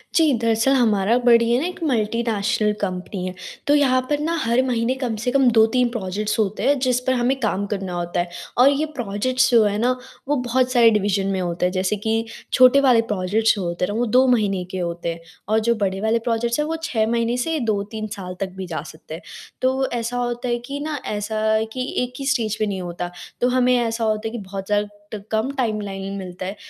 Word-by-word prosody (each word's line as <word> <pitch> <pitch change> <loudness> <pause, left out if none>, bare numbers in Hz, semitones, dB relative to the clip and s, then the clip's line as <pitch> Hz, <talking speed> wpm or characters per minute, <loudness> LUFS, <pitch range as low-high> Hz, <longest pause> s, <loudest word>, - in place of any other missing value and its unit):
जी, 315 -4 +4
दरअसल 230 +3 +2
हमारा 225 -2 +3
बड़ी 235 -1 +5
है 245 - +3
ना 325 - -1
एक 360 -1 -8
मल्टीनेशनल 225 -4 0
कंपनी 185 0 -3
है, 185 - -4 0.3
तो 290 - +5
यहाँ 265 -3 +4
पर 295 - +1
न 305 +2 -1
हर 235 +2 +2
महीने 240 +1 +1
कम 230 -3 -1
से 250 - 0
कम 270 -1 +4
2-3 240 +3 +4
प्रोजेक्ट्स 210 -1 -2
होते 210 -1 0
हैं 285 - +4
जिस 250 -1 +1
पर 260 - +4
हमें 255 +2 +1
काम 205 -4 -1
करना 190 -2 -4
होता 175 0 -2
है 175 0 -1 0.3
और 255 +3 +7
ये 285 +2 +1
प्रोजेक्ट्स 245 +3 +1
जो 230 -2 +6
है 205 -1 +1
ना 240 +4 +2 0.4
वो 295 - +2
बहुत 250 0 0
सारे 235 -2 +6
डिवीज़न 200 -2 +1
में 195 -1 -1
होते 175 0 -1
हैं, 180 - +1
जैसे 185 +2 0
कि 225 +2 -1 0.3
छोटे 255 +1 +7
वाले 250 -4 +5
प्रोजेक्ट्स 210 +4 +2
जो 200 - -3
होते 175 +1 -1
हैं 205 - -4
ना 225 - -2
वो 245 - +2
2 250 +3 +4
महीने 205 -7 +2
के 190 - -4
होते 170 -1 -3
हैं 165 - -11 0.3
और 220 +1 +3
जो 235 - +4
बड़े 190 +1 -2
वाले 220 +1 +2
प्रोजेक्ट्स 235 +3 0
हैं 300 - +1
वो 325 - -2
6 225 -8 0
महीने 235 +1 0
से 325 -2 -1
2-3 215 -1 -2
साल 180 -2 -6
तक 195 -1 -2
भी 190 -1 -5
जा 160 -4 -4
सकते 155 0 -12
हैं। 165 - -7 0.4
तो 260 +1 +1
ऐसा 240 +1 -2
होता 240 0 -2
है 240 - +1
कि 280 +2 -5
ना 300 -1 -3
ऐसा 210 +1 -3 0.2
अ, 220 - 0
कि 255 - -3 0.2
एक 250 0 -5
ही 275 - -4
स्टेज 225 -6 +1
पे 215 - +2
नहीं 195 -2 -3
होता 175 0 -5 0.3
तो 245 - +4
हमें 250 0 +3
ऐसा 230 -1 -1
होता 215 0 0
है - - -5
कि 235 - -5
बहुत 195 -1 -6
ज़्यादा 205 0 +1 0.3
ट - - -2
कम 220 +4 0
टाइमलाइन 200 -5 -2
मिलता 185 -1 -7
है, 195 +3 -4
225 Hz, 230 wpm, -22 LUFS, 195-250 Hz, 0.4 s, और